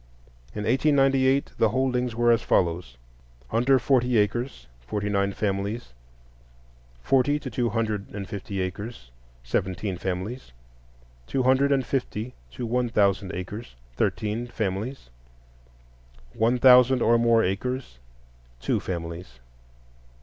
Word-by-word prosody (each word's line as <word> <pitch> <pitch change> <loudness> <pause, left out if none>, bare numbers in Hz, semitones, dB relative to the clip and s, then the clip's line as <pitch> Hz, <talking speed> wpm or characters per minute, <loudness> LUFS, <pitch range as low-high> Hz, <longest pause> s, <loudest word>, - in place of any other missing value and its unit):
In 105 - -3
1898 135 +1 +3
the 115 - +4
holdings 125 0 0
were 120 0 +3
as 115 - +3
follows: 85 -8 0 0.5
Under 125 +4 +4
forty 125 -2 +2
acres, 105 - -1
forty 105 - -3
nine 100 -1 +1
families; 100 - -3 1.1
forty 135 +2 +3
to 140 -3 -7
two 120 +1 0
hundred 110 -2 -2
and 100 -2 -6
fifty 100 -2 -4
acres, 95 - -6 0.3
seventeen 90 - -2
families; 95 - -4 0.7
two 130 - 0
hundred 130 +2 +3
and 135 -2 +2
fifty 125 -2 -3 0.2
to 90 - -6
one 120 +1 0
thousand 100 -4 +1
acres, 95 - -7 0.2
thirteen 110 - -1
families; 110 - -4 1.2
one 115 +3 +2
thousand 125 0 +6
or 115 +1 +4
more 115 -1 +4
acres, 100 - -3 0.6
two - - 0
families. 85 -7 -6
115 Hz, 115 wpm, -25 LUFS, 95-125 Hz, 1.2 s, thousand